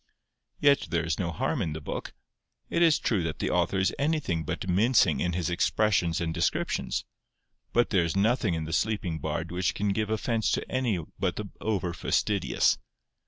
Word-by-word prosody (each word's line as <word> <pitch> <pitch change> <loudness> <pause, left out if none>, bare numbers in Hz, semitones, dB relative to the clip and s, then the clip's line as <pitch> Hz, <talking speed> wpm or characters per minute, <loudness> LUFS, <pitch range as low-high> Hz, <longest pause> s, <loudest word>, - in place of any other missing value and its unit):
'Yet 145 -1 +4
there 85 0 0
is 80 - -1
no 85 -3 -1
harm 80 - -1
in 80 - -1
the 80 - -5
book. 70 - -6 0.6
It 170 - +1
is 165 -3 +6
true 105 -6 0
that 80 -3 -3
the - - -1
author 95 - +1
is 95 0 +2
anything 140 - 0
but 90 - -4
mincing 105 +6 +3
in 90 0 0
his 85 0 -1
expressions 90 -1 +1
and 80 -1 -2
descriptions, 85 - -1 0.7
but 120 0 +2
there 95 -5 +3
is 85 +1 -2
nothing 105 -2 +2
in 80 -1 -3
the 80 - -5
Sleeping 95 -6 0
Bard 80 +2 -3
which 90 0 0
can 105 0 0
give 105 +2 0
offence 110 0 0
to - - -1
any 125 -6 +1 0.2
but - - 0
the - - -6
over 95 -5 -1
fastidious. 90 -6 +1
90 Hz, 185 wpm, -28 LUFS, 85-110 Hz, 0.7 s, is